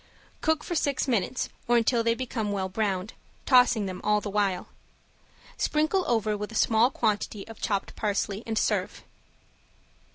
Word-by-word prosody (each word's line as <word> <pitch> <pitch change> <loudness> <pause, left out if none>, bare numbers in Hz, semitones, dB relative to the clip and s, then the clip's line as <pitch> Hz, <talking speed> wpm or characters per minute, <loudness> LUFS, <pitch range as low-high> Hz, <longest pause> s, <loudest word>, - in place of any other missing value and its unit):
Cook 315 -1 +1
for - - -4
six 285 -4 0
minutes, 235 -1 0 0.2
or 240 0 +4
until 235 0 +2
they 230 0 +2
become 230 -4 -3
well 190 -2 -2
browned, 195 -1 -2 0.3
tossing 250 -5 +5
them 185 -1 -5
all 210 0 +3
the 205 -1 -5
while. 200 -3 0 0.9
Sprinkle 310 +5 +1
over 220 -3 +1
with 210 +1 -5
a - - -9
small 225 +2 +4
quantity 215 -4 -1
of 225 - -11
chopped 200 -2 -2
parsley, 205 -1 -1
and 220 -1 -2
serve. - - 0
220 Hz, 155 wpm, -27 LUFS, 205-245 Hz, 0.9 s, tossing